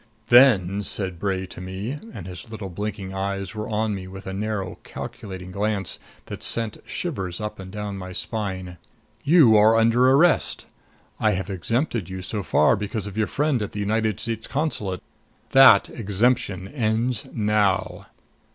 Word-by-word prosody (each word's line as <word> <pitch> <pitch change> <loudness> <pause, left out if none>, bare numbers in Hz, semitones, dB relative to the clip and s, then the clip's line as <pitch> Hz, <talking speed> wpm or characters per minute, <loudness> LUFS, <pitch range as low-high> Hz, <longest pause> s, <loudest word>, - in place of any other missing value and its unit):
"Then," 105 -7 +6
said 95 -3 -1
Bray 95 -1 -1
to 90 - -10
me, 95 +10 -5
and 90 - -8
his 90 +4 -9
little 105 -3 -6
blinking 100 +1 -5
eyes 100 +1 -3
were 110 0 -5
on 110 0 0
me 95 -2 -6
with 95 +1 -10
a 95 - -5
narrow 100 -2 -3
calculating 95 -2 -8
glance 100 -2 -2 0.3
that - - -8
sent 115 -2 -1
the - - -15
shivers 95 - -4
up 105 -1 -5
and 95 -1 -8
down 105 -1 -5
my 95 0 -7
spine, 95 -4 -4 0.4
"you 145 -8 +6
are 110 +1 +6
under 115 +3 +4
arrest. 140 - +4 0.5
I 110 -1 +3
have 95 +1 -3
exempted 115 - -1
you 95 0 -6
so 105 +2 -3
far 75 -4 +3
because 105 0 -4
of 100 -2 -7
your 110 -1 +1
friend 145 -4 0
at 105 - -4
the 105 - -4
United 110 0 0
States 115 -1 -3
Consulate. 110 - -2 0.5
That 130 -7 +8
exemption 100 -3 0
ends 115 -1 -1
now." 105 -3 0
105 Hz, 160 wpm, -24 LUFS, 95-115 Hz, 0.5 s, That